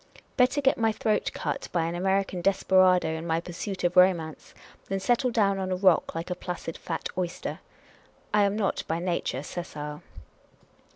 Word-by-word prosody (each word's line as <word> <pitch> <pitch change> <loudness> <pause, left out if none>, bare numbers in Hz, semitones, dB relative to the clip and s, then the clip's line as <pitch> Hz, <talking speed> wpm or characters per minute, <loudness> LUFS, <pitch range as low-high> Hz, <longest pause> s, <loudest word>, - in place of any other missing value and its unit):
Better 255 +3 +3
get 270 -3 +2
my 225 -1 +3
throat 215 0 0
cut - - -4
by 170 -2 +1
an 165 - -2
American 190 0 0
desperado, 185 -2 +4
in 160 +1 -4
my 165 0 +1
pursuit 180 +3 -6
of 175 +1 +1
romance, 175 -4 +2 0.3
than 195 0 -1
settle 245 +6 +2
down 200 -4 +2
on 185 -1 -2
a - - +1
rock 185 -3 +3
like 165 +2 -4
a - - 0
placid 175 -2 -5
fat 165 -2 -4
oyster. 180 -1 -3 0.7
I 210 - +5
am 200 0 0
not 210 -3 0
by 160 - -1
nature 170 -6 -2
sessile. 150 -3 -6
185 Hz, 170 wpm, -27 LUFS, 170-195 Hz, 0.7 s, I